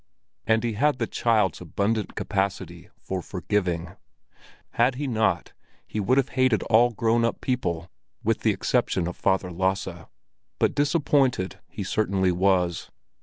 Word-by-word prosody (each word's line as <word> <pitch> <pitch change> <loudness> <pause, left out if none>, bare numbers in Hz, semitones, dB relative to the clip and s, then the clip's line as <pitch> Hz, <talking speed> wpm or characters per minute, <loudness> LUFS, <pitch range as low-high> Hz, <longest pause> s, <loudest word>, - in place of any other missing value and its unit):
And 110 0 +3
he 115 -1 -1
had 145 +6 +2
the 115 - 0
child's 110 -8 +1
abundant 100 +6 -1
capacity 95 -4 -3
for 95 -1 -4
forgiving; 90 -2 -2 0.7
had 125 +2 +2
he 145 +3 -3
not 110 -5 0 0.3
he 110 - -4
would 125 +6 +2
have 135 0 +2
hated 130 -4 +2
all 115 +2 +4
grown 115 +1 +1
up 115 - 0
people 85 -10 -2 0.4
with - - +1
the - - +1
exception 85 -2 0
of 90 - -5
Father 95 -2 0
Lasse. 95 -1 -2 0.5
But - - +2
disappointed 140 - +1
he 100 - -5
certainly 95 -2 +1
was. 90 -2 +1
105 Hz, 140 wpm, -25 LUFS, 90-120 Hz, 0.7 s, all